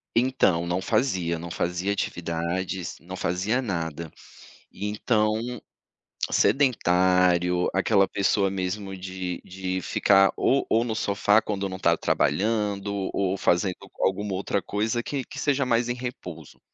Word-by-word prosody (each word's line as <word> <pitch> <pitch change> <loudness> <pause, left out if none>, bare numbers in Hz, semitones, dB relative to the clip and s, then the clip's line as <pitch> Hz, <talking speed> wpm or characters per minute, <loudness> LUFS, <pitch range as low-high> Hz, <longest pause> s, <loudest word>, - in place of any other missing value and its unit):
Então, 115 -9 +2
não 90 +2 -1
fazia, 90 -9 0
não 85 +1 -7
fazia 90 +4 -1
atividades, 85 +1 -3
não 90 +2 -8
fazia 100 +8 0
nada, 85 - -4 0.6
então, 105 +2 0 1.0
sedentário, 90 -8 +3
aquela 100 0 +3
pessoa 100 0 +1
mesmo 95 +1 -3
de 95 -1 -5
de 95 0 -4
ficar 95 +2 +4
ou 135 - +2
ou 115 +2 +3
no 110 -2 -2
sofá, 105 0 +2
quando 100 -2 -2
não 95 0 -7
tá - - +3
trabalhando 100 -2 0
ou 95 0 0
fazendo 90 +1 +1 0.3
alguma 95 +1 0
outra 100 +1 -1
coisa 110 +3 -1
que 135 -1 -3
que - - -12
seja 140 -2 +1
mais 120 0 +1
em 120 - 0
repouso. 90 - -8
95 Hz, 130 wpm, -25 LUFS, 90-105 Hz, 1.0 s, ficar